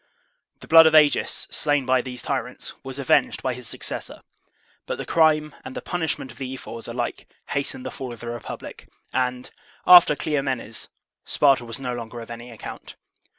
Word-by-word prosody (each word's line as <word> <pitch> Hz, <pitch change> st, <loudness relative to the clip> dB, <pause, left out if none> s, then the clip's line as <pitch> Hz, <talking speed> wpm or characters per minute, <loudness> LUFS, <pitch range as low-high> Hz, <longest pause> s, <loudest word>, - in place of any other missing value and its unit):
The -, -, -11 dB
blood 165 Hz, 0 st, +9 dB
of 160 Hz, -, +3 dB
Agis, 150 Hz, -2 st, +4 dB
slain 145 Hz, -2 st, +2 dB
by 130 Hz, 0 st, +3 dB
these 125 Hz, -2 st, -7 dB
tyrants, -, -, -3 dB
was 135 Hz, 0 st, -6 dB
avenged 140 Hz, -2 st, +2 dB
by 130 Hz, -, 0 dB
his 125 Hz, -2 st, -7 dB
succes -, -, -4 dB
sor; -, -, -11 dB, 0.7 s
but -, -, -3 dB
the -, -, -5 dB
crime 155 Hz, -2 st, +3 dB
and 260 Hz, 0 st, -8 dB
the 250 Hz, -, -4 dB
punishment 160 Hz, -7 st, -2 dB
of 120 Hz, -, -16 dB
the 130 Hz, -1 st, -4 dB
ephors 115 Hz, -3 st, -8 dB
alike 120 Hz, 0 st, -4 dB, 0.2 s
hastened 140 Hz, -2 st, -3 dB
the -, -, -4 dB
fall 130 Hz, -2 st, -6 dB
of 120 Hz, -, -9 dB
the 120 Hz, -, -5 dB
republic, 120 Hz, -1 st, -8 dB, 0.3 s
and, 125 Hz, 0 st, -1 dB, 0.3 s
after 175 Hz, -4 st, +9 dB
Cleom 145 Hz, -2 st, -1 dB
enes, 115 Hz, -3 st, -4 dB, 0.4 s
Sparta 135 Hz, -4 st, +3 dB
was 115 Hz, +1 st, -6 dB
no 125 Hz, -2 st, -3 dB
longer 120 Hz, 0 st, -6 dB
of 115 Hz, 0 st, -9 dB
any 120 Hz, +1 st, -8 dB
account. 115 Hz, -3 st, -9 dB
130 Hz, 185 wpm, -24 LUFS, 120-150 Hz, 0.7 s, blood